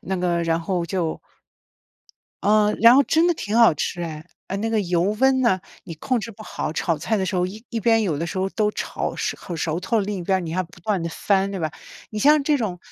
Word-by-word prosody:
那 190 Hz, -, -3 dB
个 175 Hz, -1 st, 0 dB
然 165 Hz, 0 st, 0 dB
后 175 Hz, 0 st, -1 dB
就 170 Hz, -2 st, -2 dB, 1.2 s
嗯， 210 Hz, 0 st, +3 dB
然 230 Hz, +1 st, +9 dB
后 275 Hz, -, +6 dB
真 325 Hz, +4 st, +3 dB
的 350 Hz, -, +4 dB
挺 215 Hz, -7 st, -3 dB
好 230 Hz, -5 st, +7 dB
吃 175 Hz, +3 st, -3 dB
哎， 155 Hz, -2 st, -6 dB, 0.2 s
呃， 195 Hz, -, -3 dB
那 225 Hz, +3 st, -1 dB
个 225 Hz, -1 st, +1 dB
油 175 Hz, -2 st, +1 dB, 0.2 s
温 265 Hz, 0 st, +4 dB
呐， 235 Hz, -7 st, +3 dB, 0.3 s
你 165 Hz, -, -7 dB
控 240 Hz, -, -1 dB
制 230 Hz, -, -6 dB
不 215 Hz, 0 st, -12 dB
好， -, -, -4 dB
炒 165 Hz, 0 st, 0 dB
菜 220 Hz, +8 st, -1 dB
的 190 Hz, -, 0 dB
时 190 Hz, -, -3 dB
候 180 Hz, 0 st, +1 dB
一 215 Hz, +5 st, -9 dB
一 230 Hz, -, -2 dB
边 225 Hz, +1 st, +3 dB
有 165 Hz, -8 st, -1 dB
的 165 Hz, -, -2 dB
时 175 Hz, -, -6 dB
候 190 Hz, +1 st, 0 dB
都 210 Hz, 0 st, 0 dB
炒 -, -, -4 dB
熟 -, -, -2 dB
很 175 Hz, -3 st, -6 dB
熟 160 Hz, +2 st, -2 dB
透， 225 Hz, +5 st, 0 dB
另 205 Hz, 0 st, -3 dB
一 -, -, -5 dB
边 190 Hz, +2 st, +1 dB
儿 -, -, -1 dB
你 170 Hz, -3 st, -5 dB
要 185 Hz, +3 st, 0 dB
不 175 Hz, 0 st, -15 dB
断 195 Hz, 0 st, -1 dB
地 170 Hz, -, -2 dB
翻， 195 Hz, +3 st, 0 dB
对 195 Hz, -, -4 dB
吧？ 160 Hz, -3 st, -2 dB, 0.4 s
你 215 Hz, -, -4 dB
像 295 Hz, +5 st, +5 dB
这 295 Hz, 0 st, +2 dB
种 200 Hz, -7 st, -3 dB
195 Hz, 275 characters per minute, -23 LUFS, 170-225 Hz, 1.2 s, 然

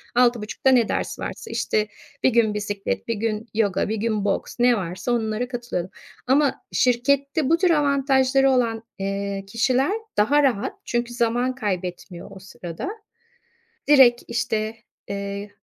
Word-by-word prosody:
6.30'da 240 Hz, 0 st, +2 dB
ne 245 Hz, -4 st, +4 dB
ders -, -, -2 dB
varsa, -, -, -6 dB
işte, 215 Hz, 0 st, 0 dB, 0.4 s
1 -, -, +6 dB
gün 225 Hz, -3 st, +3 dB
bisiklet, 205 Hz, -1 st, -3 dB
1 230 Hz, -, 0 dB
gün 220 Hz, +1 st, -2 dB
yoga, 205 Hz, -3 st, +1 dB
1 220 Hz, -, 0 dB
gün 215 Hz, -1 st, -1 dB
boks, 200 Hz, -, -1 dB
ne 245 Hz, -1 st, +4 dB
varsa 185 Hz, +5 st, -3 dB
onlara 225 Hz, 0 st, -1 dB
katılıyordum. 240 Hz, -8 st, -4 dB, 0.4 s
Ama 275 Hz, +1 st, +2 dB
şirkette 275 Hz, +4 st, +1 dB
bu 330 Hz, -, +4 dB
tür 365 Hz, +1 st, +2 dB
avantajları 270 Hz, -2 st, +3 dB
olan, 230 Hz, -3 st, +1 dB, 0.2 s
eee, 195 Hz, 0 st, -3 dB
kişiler 255 Hz, -, +1 dB, 0.3 s
daha 285 Hz, +8 st, +4 dB
rahat 255 Hz, -2 st, +1 dB
çünkü 240 Hz, 0 st, -2 dB
zaman 240 Hz, +2 st, 0 dB
kaybetmiyor 185 Hz, -4 st, -4 dB
o 190 Hz, -, -11 dB
sırada. 180 Hz, -, -7 dB, 1.0 s
Direkt, 265 Hz, -5 st, +6 dB
işte, 225 Hz, -2 st, -2 dB, 0.3 s
eee, 200 Hz, +1 st, -5 dB
230 Hz, 140 wpm, -23 LUFS, 205-260 Hz, 1.0 s, 1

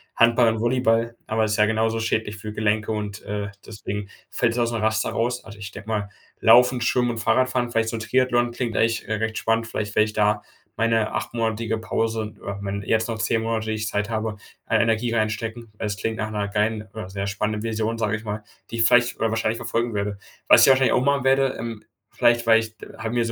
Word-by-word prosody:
Handball 115 Hz, 0 st, +5 dB
und 110 Hz, -, -3 dB
Volleyball, 115 Hz, -1 st, +1 dB
aber 110 Hz, 0 st, +1 dB
ist 105 Hz, 0 st, -1 dB
ja 105 Hz, -, +5 dB
genauso 110 Hz, +1 st, +1 dB
schädlich 110 Hz, -2 st, -1 dB
für 105 Hz, +1 st, -7 dB
Gelenke 105 Hz, 0 st, 0 dB
und, 105 Hz, -1 st, -4 dB
äh, 105 Hz, 0 st, -4 dB
deswegen 105 Hz, -2 st, -6 dB, 0.2 s
fällt 115 Hz, -, +1 dB
das -, -, -5 dB
aus 120 Hz, 0 st, +1 dB
dem 115 Hz, -2 st, -2 dB
Raster 110 Hz, 0 st, +1 dB
raus. 120 Hz, +2 st, -1 dB
Also, 105 Hz, -1 st, -11 dB
ich 100 Hz, -1 st, -6 dB
denke 100 Hz, -, -10 dB
mal, 105 Hz, -2 st, -2 dB, 0.3 s
Laufen, 125 Hz, +2 st, +6 dB
Schwimmen 120 Hz, +1 st, +2 dB
und 115 Hz, -, -5 dB
Fahrradfahren, 130 Hz, +1 st, +1 dB
vielleicht 115 Hz, -1 st, 0 dB
so -, -, -3 dB
'n -, -, -3 dB
Triathlon, 120 Hz, +1 st, +2 dB
klingt 120 Hz, -1 st, -3 dB
eigentlich 115 Hz, 0 st, +1 dB
re 110 Hz, -1 st, -1 dB
recht 110 Hz, 0 st, -2 dB
spannend. 115 Hz, 0 st, 0 dB
Vielleicht 105 Hz, -2 st, -4 dB
wäre 110 Hz, -, +5 dB
ich 110 Hz, -, -6 dB
da 105 Hz, 0 st, +2 dB, 0.4 s
meine 115 Hz, -1 st, +2 dB
8-monatige 115 Hz, -1 st, -1 dB
Pause 110 Hz, 0 st, -2 dB
oder 100 Hz, 0 st, -5 dB
wenn 100 Hz, 0 st, -3 dB
jetzt 110 Hz, +2 st, +1 dB
noch 115 Hz, -1 st, -3 dB
10 110 Hz, +1 st, +1 dB
Monate, 115 Hz, -1 st, -2 dB
die 110 Hz, -, 0 dB
ich 110 Hz, 0 st, -2 dB
Zeit 105 Hz, +1 st, -1 dB
habe, 110 Hz, -1 st, -2 dB, 0.3 s
an -, -, +2 dB
Energie 115 Hz, +1 st, +1 dB
reinstecken, 110 Hz, +1 st, -2 dB
weil 110 Hz, -, -3 dB
es 100 Hz, -1 st, -3 dB
klingt 110 Hz, +1 st, -2 dB
nach 110 Hz, 0 st, -3 dB
'ner 105 Hz, -1 st, -2 dB
geilen 105 Hz, +1 st, -1 dB
oder 110 Hz, -3 st, -6 dB
sehr 100 Hz, +1 st, -4 dB
spannenden 105 Hz, +1 st, -2 dB
Vision, 115 Hz, 0 st, -1 dB
sage 105 Hz, -1 st, 0 dB
ich 105 Hz, -, -7 dB
mal, 105 Hz, 0 st, -4 dB, 0.3 s
die 115 Hz, -, -4 dB
ich 115 Hz, -, +3 dB
vielleicht 120 Hz, +1 st, +4 dB
oder 115 Hz, -, +1 dB
wahrscheinlich 110 Hz, 0 st, 0 dB
verfolgen 115 Hz, 0 st, -2 dB
werde. 100 Hz, 0 st, -2 dB, 0.3 s
Was -, -, +8 dB
ich -, -, +5 dB
wahrscheinlich 130 Hz, 0 st, +4 dB
auch 125 Hz, -, +2 dB
machen 140 Hz, -2 st, +2 dB
werde, 135 Hz, 0 st, +3 dB
ähm, 115 Hz, -2 st, -6 dB, 0.3 s
vielleicht, 120 Hz, -1 st, +3 dB
weil 115 Hz, -1 st, +7 dB
ich 110 Hz, -1 st, -6 dB, 0.2 s
habe 110 Hz, +2 st, -4 dB
mir 120 Hz, -1 st, +2 dB
so 115 Hz, -, -2 dB
110 Hz, 230 wpm, -23 LUFS, 105-115 Hz, 0.4 s, Was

